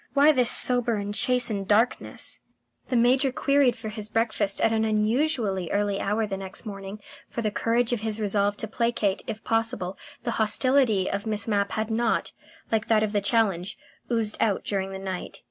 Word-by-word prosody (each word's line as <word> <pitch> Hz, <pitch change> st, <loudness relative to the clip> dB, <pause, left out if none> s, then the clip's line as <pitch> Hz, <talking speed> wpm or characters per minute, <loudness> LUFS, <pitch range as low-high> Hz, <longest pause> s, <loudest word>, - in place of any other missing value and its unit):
Why 285 Hz, +2 st, +6 dB
this 250 Hz, -5 st, +2 dB
sober 245 Hz, -2 st, +5 dB
and 205 Hz, 0 st, -4 dB
chastened 225 Hz, -4 st, +1 dB
darkness...? 220 Hz, +4 st, 0 dB, 0.5 s
The 255 Hz, -, 0 dB
Major 255 Hz, +3 st, +3 dB
qui 275 Hz, 0 st, -2 dB
hied 245 Hz, -3 st, +3 dB
for 225 Hz, -2 st, -7 dB
his 215 Hz, -1 st, -5 dB
breakfast 215 Hz, -3 st, 0 dB
at 225 Hz, -, +2 dB
an 220 Hz, 0 st, +1 dB
unusually 215 Hz, -, 0 dB
early 205 Hz, -1 st, 0 dB
hour 215 Hz, +2 st, 0 dB
next 195 Hz, +1 st, -5 dB
morning, 195 Hz, 0 st, -7 dB, 0.3 s
for 235 Hz, -, -4 dB
the 215 Hz, -, 0 dB
courage 235 Hz, +3 st, +1 dB
of 240 Hz, -, -1 dB
his 220 Hz, -1 st, -1 dB
resolve 205 Hz, -1 st, 0 dB
to 220 Hz, -, -4 dB
placate, 225 Hz, -3 st, -1 dB
if 220 Hz, -, -6 dB
possible, 225 Hz, -5 st, -2 dB, 0.2 s
the 240 Hz, -, -1 dB
hostility 225 Hz, -3 st, +2 dB
of 200 Hz, +2 st, -3 dB
Miss 210 Hz, -1 st, -1 dB
Mapp 200 Hz, -2 st, 0 dB
had 220 Hz, 0 st, -2 dB
not, 225 Hz, 0 st, 0 dB, 0.4 s
like 220 Hz, -1 st, 0 dB
that 215 Hz, -1 st, +3 dB
of 215 Hz, -, -1 dB
the 205 Hz, -1 st, 0 dB
challenge, 200 Hz, -3 st, 0 dB, 0.3 s
oozed 225 Hz, -2 st, 0 dB
out 210 Hz, -4 st, +1 dB
during 195 Hz, -1 st, -2 dB
the 190 Hz, -, -5 dB
night. 190 Hz, -1 st, -6 dB
220 Hz, 180 wpm, -25 LUFS, 200-235 Hz, 0.5 s, Why